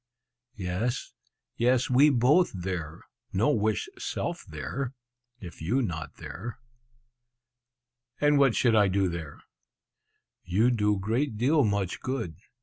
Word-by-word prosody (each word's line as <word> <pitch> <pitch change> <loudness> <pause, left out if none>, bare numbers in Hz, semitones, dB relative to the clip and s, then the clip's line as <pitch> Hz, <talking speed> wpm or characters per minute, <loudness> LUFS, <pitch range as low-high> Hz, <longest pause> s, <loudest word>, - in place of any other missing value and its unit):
"Yes, 105 +6 -2 0.4
yes, 125 +1 +3
we 135 +4 +6
both 145 +7 +4
there; 85 -3 -5 0.3
no 105 +9 +3
wish 110 -6 0
self - - -3
there, 135 0 -4 0.4
if 85 -7 -10
you 120 +12 +1
not 80 -8 -4
there!" 120 +1 -7 1.6
"And 145 -1 +4
what 135 -5 +4
should 120 -3 +3
I 105 -2 +5
do 95 0 +1
there?" 85 -4 -6 1.0
"You 105 +8 +2
do 105 -3 +2
great 110 +5 -1
deal 140 +6 +3
much 100 -4 -1
good! 125 -11 -3
110 Hz, 120 wpm, -28 LUFS, 95-130 Hz, 1.6 s, we